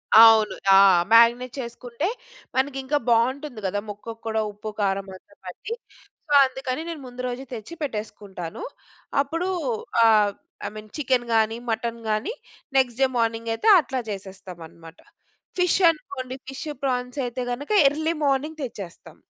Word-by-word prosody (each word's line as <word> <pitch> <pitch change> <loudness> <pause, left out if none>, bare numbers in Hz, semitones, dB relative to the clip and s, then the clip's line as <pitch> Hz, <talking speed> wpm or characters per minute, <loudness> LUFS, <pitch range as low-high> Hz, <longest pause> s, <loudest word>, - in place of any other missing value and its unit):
అవును. 225 -1 +8 0.2
ఆ! - - +8 0.4
మాగ్నేట్ 235 +2 +5
చేసుకుంటే 240 +4 -4 0.5
మనకి 265 +1 0
ఇంకా 285 +3 +1
బాగుంటుంది 245 +2 +1
కదా! 205 +2 -1
ముక్కకు 225 +2 -8
కూడా 220 0 0
ఉప్పు 210 +1 -7
కారం 195 -1 0
అంతా 200 +2 -18
పట్టి 185 - -6 0.6
సో, - - -7
అందుకని 265 +1 -4
నేను 325 -4 -6
ముందు 250 0 -8
రోజు 250 +1 -4
తెచ్చి 230 +7 -7
పెట్టేసుకుంటాను. 210 - -6 0.6
అప్పుడు 330 +6 -2 0.6
ఆహ్, 215 -2 +5 0.4
ఐమీన్ 215 0 -9
చికెన్ 255 -4 +1
కానీ, 225 0 +2
మటన్ 230 +1 -2
గాని 215 - -1 0.4
నెక్స్ట్ 250 -2 +2
డే 265 - +6
మార్నింగ్ 230 0 0
అయితే 225 - -2
అట్లా 265 -4 -3
చేసేస్తాం 190 -2 -8
అన్నమాట. 165 +1 -15 0.6
ఫిష్ 360 +1 +3
అనుకోండి 260 -5 -6
ఫిష్, 270 +3 -7 0.2
ప్రాన్స్ 250 0 -2
అయితే 250 +1 -4
గనుక 280 +4 -6 0.2
ఎర్లీ 315 +3 -1
మార్నింగ్ 295 +3 0
తెచ్చేస్తాం. 200 -9 -8
235 Hz, 135 wpm, -24 LUFS, 215-270 Hz, 0.6 s, అవును